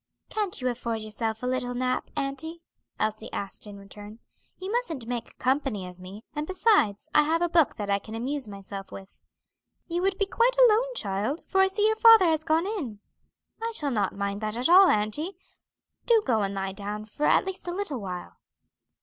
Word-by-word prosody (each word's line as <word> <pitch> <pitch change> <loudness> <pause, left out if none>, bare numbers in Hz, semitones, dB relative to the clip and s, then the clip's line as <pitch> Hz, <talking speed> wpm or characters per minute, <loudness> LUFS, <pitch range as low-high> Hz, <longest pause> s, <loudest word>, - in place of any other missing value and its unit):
"Can't 415 -7 -1
you 255 - -1
afford 235 -2 -2
yourself 220 +1 -4
a - - -1
little 250 -1 -1
nap, 255 0 -1
auntie?" 320 +5 -4 0.4
Elsie 215 +1 -2
asked 200 +1 -6
in 205 -1 -9
return. 205 +2 -11 0.4
"You 375 +2 -5
mustn't 340 - -2
make 240 0 -5
company 260 -7 0
of 180 0 -11
me; 190 +4 -10
and, 300 0 -3
besides, 370 - +2
I 300 - +7
have 325 +3 +1
a - - +3
book 330 -6 +3
that 205 - -4
I 200 - +2
can 220 +2 -9
amuse 260 +2 -2
myself 195 -1 -8
with." 195 0 -12 0.7
"You 345 +1 -2
would 385 0 +1
be 400 - +1
quite 475 +5 +2
alone, - - +4
child, 205 - -2
for 385 - +2
I 385 - +5
see 405 +2 0
your 440 0 +3
father 450 -3 +8
has 315 -2 +2
gone 320 +2 +2
in." 305 - -4 0.6
"I 460 0 -2
shall 290 -6 +1
not 205 -5 0
mind 200 +1 -3
that 215 +1 -3
at 250 +6 +1
all, 375 +2 +8
auntie. 295 - 0 0.7
Do 455 -3 +5
go 225 -3 +2
and 200 0 -2
lie 195 0 -2
down 210 +1 -5
for 290 +8 -2
at - - +4
least 380 -1 -6
a - - -1
little 345 - -2
while." 180 -2 -7
255 Hz, 200 wpm, -27 LUFS, -, 0.7 s, father